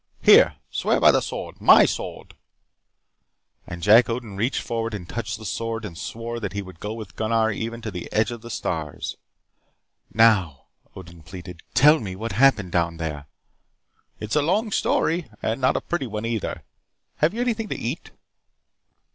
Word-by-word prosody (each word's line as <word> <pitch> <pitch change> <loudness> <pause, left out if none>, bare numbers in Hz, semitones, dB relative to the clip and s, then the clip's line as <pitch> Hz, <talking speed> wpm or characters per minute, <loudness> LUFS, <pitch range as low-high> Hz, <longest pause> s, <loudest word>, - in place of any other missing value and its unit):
Here, - - +7 0.2
swear - - +1
by - - +7
the - - +2
sword, - - -6
my - - +8
sword." - - -5 1.3
And 85 -1 -7
Jack 110 +4 +6
Odin 115 -4 -4
reached 115 +7 -1
forward 115 -1 -3
and 90 -4 -8
touched 115 +1 -4
the 110 - -11
sword 115 +2 -3
and 90 -5 -8
swore 115 +6 -5
that 100 -4 -4
he 100 - -3
would 90 -3 -13
go 105 - -5
with 110 -5 -9
Gunnar 110 0 +1
even 115 +2 -5
to 110 - -4
the 90 -2 -7
edge 110 +3 +1
of 120 -2 -7
the 120 - -10
stars 80 -8 -4 0.9
"Now," 105 - +3 0.3
Odin 85 -3 -12
pleaded. 90 +1 -10
"Tell 150 +4 +6
me 95 -5 -6
what 115 +4 -5
happened 105 -4 +3
down 85 -1 0
there." 75 -3 -5 0.9
"It 105 - -6
is - - +1
a 150 - +4
long 210 +9 0
story. 170 -3 +1 0.2
And 115 +4 -1
not 130 - +3
a - - -2
pretty 165 -7 -3
one, 105 0 -4
either. 115 -3 -3 0.5
Have 160 +7 +1
you 235 - -2
anything 225 -3 -1
to - - -4
eat?" - - -5
110 Hz, 175 wpm, -23 LUFS, 95-120 Hz, 1.3 s, my